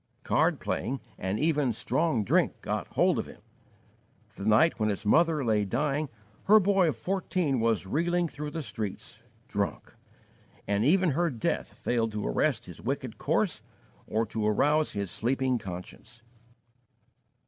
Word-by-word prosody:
Card - - +2
playing 135 +3 -2 0.2
and 95 +3 -2
even 150 -5 +2
strong 130 +2 0
drink - - +2
got - - -3
hold - - +2
of - - -3
him. - - -13 1.0
The 100 - -5
night 115 +10 +4
when 110 0 +2
his 105 +1 -3
mother 160 +4 +3
lay 110 -2 +2
dying, 140 +7 -1 0.4
her 215 +2 +7
boy 195 -2 +3
of 150 - 0
fourteen 175 -1 -1
was 110 -6 +1
reeling 175 - +1
through 150 -1 -6
the 160 +1 -5
streets, 105 -1 -6 0.3
drunk; 100 -6 -3 0.7
and 100 +1 +1
even 180 +5 +4
her 170 +5 +1
death 120 -6 -2
failed 115 -2 -1
to 105 - -2
arrest - - 0
his - - -10
wicked - - -4
course - - 0 0.5
or 110 +2 0
to 110 0 -2
arouse 150 +8 +2
his 100 -3 -3
sleeping 130 +1 0
conscience. 95 +6 -9
125 Hz, 150 wpm, -28 LUFS, 105-155 Hz, 1.0 s, her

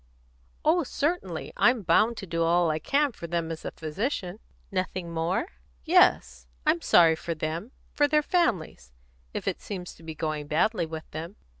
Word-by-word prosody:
"Oh, 335 +3 +4
certainly. 280 - -2
I'm 245 -3 +3
bound 215 +7 +3
to 195 - -6
do 165 -2 -2
all 170 0 +3
I 155 - -1
can 280 - +1
for 170 -6 -8
them 165 -1 -2
as 160 - -6
a - - -1
physician." 185 - -3 0.3
"Nothing 185 -2 -3
more?" 165 +3 -1 0.4
"Yes; 60 +1 +3 0.2
I'm 170 - +3
sorry 165 -2 +6
for 170 +1 -4
them 160 +9 -4 0.2
for 290 - +3
their 300 0 +3
families, 185 - 0 0.4
if - - -5
it - - -1
seems 180 -3 -6
to - - -19
be 160 -1 -7
going 155 -2 -3
badly 170 +4 +1
with 160 0 -7
them." 165 +5 -6
170 Hz, 170 wpm, -27 LUFS, 160-220 Hz, 0.4 s, sorry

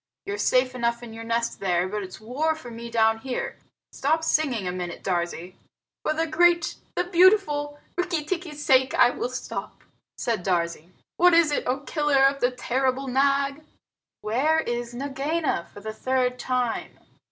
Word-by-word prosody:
You're 405 0 -4
safe 255 0 +2
enough 235 -1 -1
in 230 -2 -9
your 225 0 -8
nest 230 +1 -1
there, 180 -2 +1
but 210 +2 -3
it's 185 -1 -8
war 280 +9 -1
for 250 -6 -10
me 235 +1 -7
down 225 -1 +3
here. 255 +1 -4 0.3
Stop 315 +3 0
singing 270 - +1
a - - -1
minute, 180 -1 -5
Darzee." 175 -1 -2 0.5
"For - - 0
the 320 +1 0
great, 340 +1 +3 0.2
the - - +1
beautiful 345 -5 +3 0.2
Rikki 350 -4 -1
tikki's 315 -3 -4
sake 260 -1 +4
I 245 - +6
will 245 - -3
stop," 255 0 -6 0.3
said 225 -6 -1
Darzee. 170 -3 -1 0.3
"What 355 0 +6
is 335 -3 +5
it, 290 - -1
O 260 +2 0
Killer 295 -2 +2
of 275 0 +2
the 245 - +4
terrible 260 +1 -1
Nag?" 275 +2 +1 0.6
"Where 290 +9 +2
is 240 -3 -4
Nagaina, 280 - -2
for 205 - -11
the 220 +1 -5
third 250 +2 0
time?" 250 -2 -2
260 Hz, 165 wpm, -25 LUFS, 230-305 Hz, 0.6 s, I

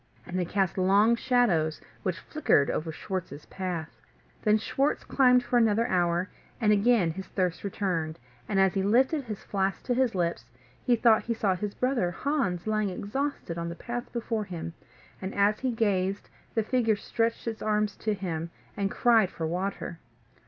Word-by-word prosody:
And 185 0 -3
they 180 - 0
cast 190 +1 0
long 200 +5 +5
shadows, 215 - +2 0.2
which 185 -3 -2
flickered 170 - +2
over 160 +1 -2
Schwartz's 175 -3 -5
path. 175 -4 -5 0.4
Then 215 0 +4
Schwartz 270 +6 0
climbed 250 -2 +4
for 245 - +1
another 225 0 +3
hour, 175 -1 +1 0.3
and 215 -3 +3
again 210 -4 +3
his 190 +3 -7
thirst 180 -3 -1
returned; 180 -6 -2 0.3
and 195 - +1
as 190 -1 +4
he 195 - 0
lifted 260 +9 +3
his 215 -3 -6
flask 195 -1 -1
to 250 - 0
his 250 -3 +1
lips, 170 -9 -1 0.4
he 245 - +4
thought 225 -1 +5
he 235 - -1
saw 200 -4 +1
his 200 +3 -4
brother 250 -8 +1
Hans 180 - -1
lying 215 -1 +1
exhausted 205 -2 -3
on 170 0 -3
the 170 - -6
path 240 +5 -5
before 230 -2 -2
him; 170 -3 -6 0.5
and, 190 +1 -5
as 205 +1 +3
he 260 - 0
gazed, 200 -4 0 0.2
the 225 - +2
figure 225 -1 +2
stretched 230 +3 -1
its 225 -1 -3
arms 210 -1 0
to 215 -1 -1
him, 170 -4 -4 0.3
and 200 -1 0
cried 225 -3 +4
for 165 - -4
water. 180 0 -3
200 Hz, 175 wpm, -28 LUFS, 180-230 Hz, 0.5 s, long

